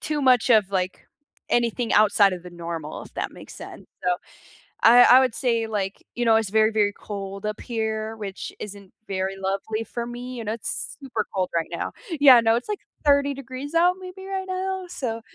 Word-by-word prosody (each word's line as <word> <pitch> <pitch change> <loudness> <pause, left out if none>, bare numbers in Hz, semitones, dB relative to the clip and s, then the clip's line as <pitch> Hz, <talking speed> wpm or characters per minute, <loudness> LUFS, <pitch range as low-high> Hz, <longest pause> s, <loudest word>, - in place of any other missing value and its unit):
too 300 -1 -2
much 255 -2 +4
of, 215 -4 +5
like, 185 -1 -2 0.4
anything 235 0 0
outside 205 -1 +5
of 175 - -9
the 180 - -10
normal, 165 -3 -6
if - - -14
that - - -3
makes - - -12
sense, - - -10 0.2
so, 180 -1 +1 0.7
I 245 +2 +8
I 255 - +8
would 255 -3 +1
say, 230 -3 0
like, 200 -3 -3
you 240 - -1
know, 225 -1 +5
it's 220 -3 -1
very, 220 +1 +3
very 210 -2 +2
cold 200 -1 -7
up 210 0 -3
here, 220 -2 -3
which 200 -2 -6
isn't 200 -2 -9 0.2
very 190 0 -2
lovely 195 +3 -2
for 235 +1 -5
me, 245 +1 -7
you 230 - -5
know, 215 0 -2
it's 230 - -3
super 255 -6 -3
cold 185 -1 0
right 165 -1 0
now - - -3 0.3
Yeah, 265 -4 +9
no, 225 0 +3
it's 240 - -4
like 420 - -2 0.3
30 285 -1 +4
degrees 270 +3 -7
out 355 +2 +4
maybe 375 +1 -9
right 385 -1 -3
now, 375 0 -3
so 230 -9 -4
225 Hz, 200 wpm, -24 LUFS, 200-260 Hz, 0.7 s, Yeah